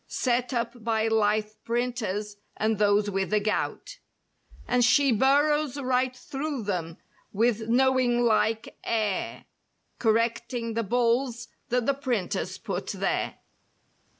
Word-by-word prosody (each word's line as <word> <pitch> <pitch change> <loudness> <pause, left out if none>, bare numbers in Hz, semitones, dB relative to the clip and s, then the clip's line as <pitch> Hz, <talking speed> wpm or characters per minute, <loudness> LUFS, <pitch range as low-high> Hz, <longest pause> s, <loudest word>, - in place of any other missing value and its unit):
Set 250 0 0
up 235 -1 -3
by 225 -1 +1
lithe 215 -1 +1
printers 230 -4 -2 0.2
and 220 -1 0
those 205 0 +3
with 195 -1 -1
the 210 - +3
gout; 210 +1 -3 0.7
And 245 0 +3
she 275 +3 +4
burrows 285 +4 +2
right 255 -1 0
through 280 -2 -4
them 175 -5 -3 0.3
with 225 +1 +1
knowing¬ 255 -1 +3
like 220 0 +1
air. 215 -4 -2 0.5
Correcting 230 +1 0
the 230 - 0
"bulls" 235 +2 0 0.2
that 245 -1 +1
the 280 - +3
printers 250 -9 -2
put - - -4
there. - - -1
235 Hz, 120 wpm, -27 LUFS, 215-250 Hz, 0.7 s, she